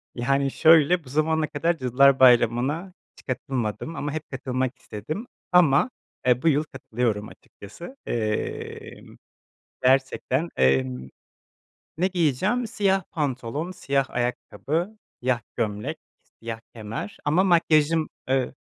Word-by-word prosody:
Yani 135 +2 +1
şöyle, 165 +1 +5
bu 130 - -14
zamana 155 +2 +1
kadar 165 +3 0
Cadılar 130 +1 +4
Bayramı'na 130 - +4 0.2
hiç - - -19
katılmadım 125 +3 -3
ama 145 0 -3
hep 155 -2 -6
katılmak 130 -1 -2
istedim, 155 - -6 0.2
ama, 175 - +5 0.4
eee, 125 0 +3
bu 165 - 0
yıl 150 0 +3
katılıyorum 115 -6 -3
açıkçası. 170 - -12
Emm 110 -2 -4 0.7
Gerçekten, 135 +3 +2
emm 65 -1 +1 0.9
Ne 185 +3 +2
giyeceğim? 190 - 0
Siyah 195 -3 +1
pantolon, 145 +2 -3
siyah 140 -6 -1
ayakkabı, 155 - -2 0.2
siyah 125 -2 +1 0.2
gömlek, 105 -2 -2 0.4
siyah 115 -1 -5
kemer 115 - -6
ama 165 +6 +3
makyajım, 165 -3 +3 0.2
ııı 130 -1 0
140 Hz, 110 wpm, -25 LUFS, 120-165 Hz, 0.9 s, şöyle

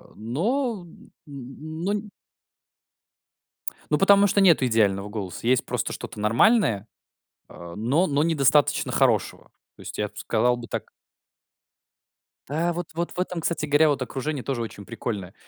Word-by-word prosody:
но, 200 - -1
м, 165 - -17 0.2
но 155 +7 -5
нь 210 0 -4 1.8
Ну, 150 - +3
потому 200 +1 +6
что 200 +1 +2
нету 170 -8 +5
идеального 105 -4 +1
голоса. 105 -1 -6
Есть 125 0 +3
просто - - -2
что-то 105 - -7
нормальное, 115 - +3 0.6
а, 85 -1 -10
но 135 - +2
но 145 0 +1
недостаточно 150 -3 +2
хорошего. - - +1 0.3
То - - -18
есть, - - -8
я 105 - 0
б 105 - -27
сказал 120 +3 +1
бы 120 - -8
так - - -5 1.6
Да, 165 +4 0
вот 175 0 -4
вот 170 +1 -2
в - - -12
этом, 180 -2 -2
кстати 160 -1 -1
говоря, 150 +2 +4
вот 145 -3 0
окружение 135 +2 -4
тоже 130 -4 -2
очень 105 -3 -8
прикольное. 100 -1 -5
140 Hz, 145 wpm, -25 LUFS, 115-170 Hz, 1.8 s, потому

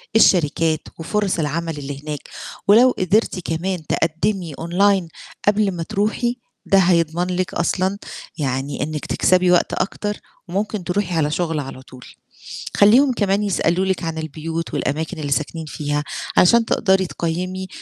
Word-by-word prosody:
الشركات 165 -5 +4 0.2
وفرص 195 +1 -1
العمل 160 +1 -2
اللي 140 0 -6
هناك 150 -2 -5 0.5
ولو 235 +5 +7
قدرتِ 190 +1 +1
كمان 175 +1 -3
تقدّمي 165 +1 -1
أونلاين 185 +2 +2 0.4
قبل 205 -1 +3
ما 170 -2 -4
تروحي، 220 +7 -1 0.3
ده 195 - +4
هيضمن 175 -1 +2
لِك 185 0 -2
أصلًا 185 +3 0 0.4
يعني 135 -1 -2
إنِّك 150 0 -4
تكسبي 185 -1 +3
وقت 175 - +3
أكتر 205 +2 -2 0.3
وممكن 200 +1 -2
تروحي 180 -1 -1
على 150 -2 +1
شُغل 165 -2 -1
على 135 -2 -7
طول. 130 -1 -14 0.7
خلّيهم 250 +7 +6
كمان 200 -2 +1
يسألوا 190 -2 +1
لِك 190 -2 -1
عن 165 -1 -3
البيوت 160 +1 -4
والأماكن 160 +4 -2
اللي 145 -2 -3
ساكنين 155 +3 -2
فيها 145 0 -2 0.3
علشان 230 +6 +6
تقدري 190 -4 +2
تقيّمي 185 +3 -3
175 Hz, 140 wpm, -21 LUFS, 160-195 Hz, 0.7 s, ولو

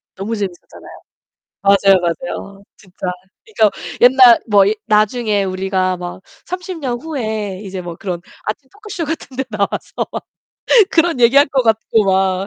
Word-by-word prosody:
너무 210 +4 -4
재밌었잖아요. 190 -4 -8 0.6
맞아요, 195 -1 +5
맞아요. 195 +2 -5
진짜. 185 -2 -9 0.4
그니까 220 - +2 0.3
옛날 250 -1 +7
뭐 200 -2 +5
이 210 - +2
나중에 215 -1 +1
우리가 185 -1 -1
막 175 +1 -8 0.2
30 365 0 -5
년 245 -5 -3
후에 220 -10 -4
이제 190 -1 -6
뭐 175 -1 -7
그런 180 -3 -5 0.2
아침 265 +5 -5
토크쇼 410 -5 -6
같은 300 -5 -6
데 265 - -1
나와서 200 -1 -2
막 - - -5 0.7
그런 330 -5 +2
얘기 240 +3 +4
할 285 - +7
것 265 -2 +1
같고 225 -1 +2
막 190 0 +1
210 Hz, 285 characters per minute, -17 LUFS, 190-260 Hz, 0.7 s, 옛날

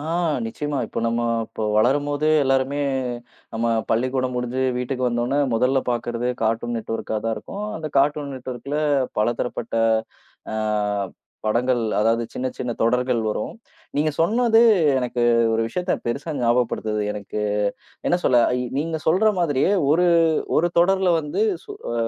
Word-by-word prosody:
ஆ, - - -7 0.4
நிச்சியமா. 145 +5 -3
இப்ப - - -5
நம்ம 115 +1 0 0.3
இப்ப - - -7
வளரும்போதே 145 +6 +2
எல்லாருமே 135 +2 +1 0.7
நம்ம 115 +1 -1 0.2
பள்ளிக்கூடம் 130 +2 0
முடிஞ்சு 125 +1 -2 0.2
வீட்டுக்கு 125 0 -2
வந்தவுடனே, 120 +4 0 0.2
முதல்ல 130 +4 +2
பாக்குறது 120 0 -2 0.2
கார்ட்டூன் 115 +2 0
நெட்ஒர்க்கா 115 0 -4
தான் 115 -1 0
இருக்கும். 205 +1 -6
அந்தக் 155 -2 -6
கார்ட்டூன் 145 0 +1
நெட்ஒர்க்குல 130 +2 -5 0.4
பலதரப்பட்ட, 120 +1 -1 0.8
அ - - -3 0.9
படங்கள் 120 +3 +1 0.2
அதாவது 115 +2 +2
சின்ன, 130 - -2
சின்ன 125 - -3
தொடர்கள் 125 +1 +2
வரும். 105 - -3 0.4
நீங்கச் 150 0 0
சொன்னது 225 +6 +4 0.4
எனக்கு 125 -1 -2 0.3
ஒரு 115 - +1
விஷயத்தப் 180 +8 -2
பெரிசா 140 +7 -3
ஞாபகப்படுத்துது. 115 -3 0
எனக்கு 105 +1 -5 0.7
என்ன 175 - +3
சொல்ல 125 - +5 0.2
இ - - -1 0.2
நீங்கச் 160 0 -3
சொல்ற 195 +7 +4
மாதிரியே 155 +2 +2 0.2
ஒரு 180 +3 +3 0.5
ஒரு 170 +3 +3
தொடர்ல 190 0 +3
வந்து, 150 +7 -2 0.2
சு - - -13 0.2
அ - - -2
130 Hz, 135 wpm, -22 LUFS, 120-150 Hz, 0.9 s, சொல்ல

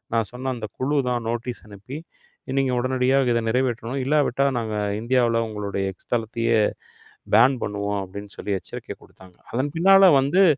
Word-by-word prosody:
நான் 115 -2 +1
சொன்ன 130 +1 -3
அந்தக் 110 -4 -8
குழுதான் 130 -4 0
நோட்டீஸ் 120 +1 -5
அனுப்பி 105 +8 -9 0.6
நீங்க 135 -1 +2
உடனடியா 130 +1 +1 0.2
இதை 115 0 +2
நிறைவேற்றணும். 125 +1 -1
இல்லாவிட்டா 140 -1 +2
நாங்க 110 -2 -3 0.2
இந்தியாவுல 120 -1 +2
உங்களோட 105 -2 -5 0.2
எக்ஸ் 95 - -17
தளத்தையே 115 0 +1 0.8
பேன் 125 +5 +6
பண்ணுவோம் 100 0 -2
அப்டின்னு 100 +2 -9
சொல்லி 100 -1 -2
எச்சரிக்கை - - -8
குடுத்தாங்க. 90 -1 -18 0.2
அதன் 135 +4 -1
பின்னால 195 +1 +7
வந்து 150 +9 +3
120 Hz, 140 wpm, -23 LUFS, 110-130 Hz, 0.8 s, பின்னால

